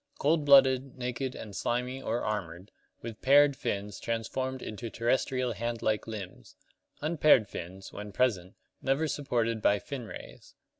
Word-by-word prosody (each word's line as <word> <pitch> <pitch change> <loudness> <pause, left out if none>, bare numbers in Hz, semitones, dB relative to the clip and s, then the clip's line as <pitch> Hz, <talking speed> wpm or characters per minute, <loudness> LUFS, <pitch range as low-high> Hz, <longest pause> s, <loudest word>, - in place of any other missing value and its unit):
Cold 150 +1 +2
blooded, 135 -2 +5
naked 125 +1 -3
and 105 -3 -8
slimy 125 +4 -2
or 120 -1 -2
armored, 95 -3 -4 0.3
with 115 -2 -7
paired 140 +1 +6
fins 100 -4 -3
transformed 130 +3 -3
into 115 +2 -6
terrestrial 125 +2 0
hand 115 +2 -4
like 110 0 0
limbs; 100 -5 -8 0.5
unpaired 150 -7 +4
fins, 95 +1 -8
when 105 0 -7
present, 100 -6 0 0.3
never 140 +4 +1
supported 120 -7 -1
by 100 - +4
fin 130 +1 -6
rays. - - -11
120 Hz, 140 wpm, -30 LUFS, 105-135 Hz, 0.5 s, paired